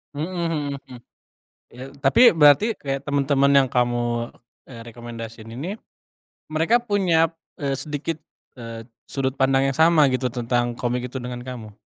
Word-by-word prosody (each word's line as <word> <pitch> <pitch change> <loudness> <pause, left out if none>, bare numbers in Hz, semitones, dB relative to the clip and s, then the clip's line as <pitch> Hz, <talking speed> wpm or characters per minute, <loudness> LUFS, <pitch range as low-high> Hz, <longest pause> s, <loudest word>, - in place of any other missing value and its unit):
Mmm, 155 +5 -3
mhm, 155 -4 -1 0.2
hmm. 125 -2 -11 0.8
Iya, 125 - -8 0.2
tapi, 140 - +6
berarti 160 +7 +5
kayak, 135 -1 -3
teman-teman 140 0 +2
yang 140 -1 +5
kamu, 120 -1 0 0.3
eee, 120 -3 -12
rekomendasiin 115 -1 -9
ini, 155 - -5 0.7
mereka 160 +10 +2
punya, 180 -8 +1 0.2
eee, 140 -2 -1
sedikit, 150 +3 -4 0.4
eee, 115 -2 -9 0.2
sudut 135 -1 -3
pandang 135 0 +2
yang 135 - -1
sama 160 -1 +5
gitu, 130 -2 -1
tentang 120 0 -1
komik 125 0 -2
itu 130 - -4
dengan 125 0 -6
kamu? 115 -5 -8
135 Hz, 140 wpm, -23 LUFS, 120-150 Hz, 0.8 s, tapi